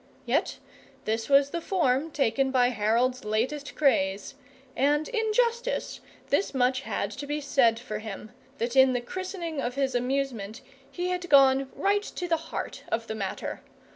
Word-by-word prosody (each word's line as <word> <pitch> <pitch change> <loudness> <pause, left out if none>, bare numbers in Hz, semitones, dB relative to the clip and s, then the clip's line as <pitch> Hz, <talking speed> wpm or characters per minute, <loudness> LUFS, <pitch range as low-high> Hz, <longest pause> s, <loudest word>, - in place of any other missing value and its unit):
Yet - - 0 0.5
this 225 +3 -1
was 280 0 +5
the 340 - -3
form 320 -5 +1
taken 270 -2 +1
by 250 -2 +3
Harold's 240 +3 +1
latest 245 +8 -2
craze; 195 -9 +1 0.4
and 295 +3 +2
in 445 -3 -1
justice 475 +2 0 0.3
this 390 - +1
much 255 +1 +2
had 200 -5 -3
to 280 +7 -7
be 295 +1 -2
said 265 -5 +3
for 215 -3 -5
him, 215 0 -8 0.3
that 235 +1 -2
in 265 -1 +6
the 245 - 0
christening 345 +1 -5
of 245 0 -3
his 270 -2 0
amusement 245 -4 -2 0.3
he 360 0 -3
had 360 -1 -3
gone 270 -1 +5
right 405 +1 +2
to 360 -3 -5
the 335 -1 +2
heart - - -5
of 225 0 -1
the 220 - -4
matter. 200 -3 -4
270 Hz, 165 wpm, -27 LUFS, 235-310 Hz, 0.5 s, in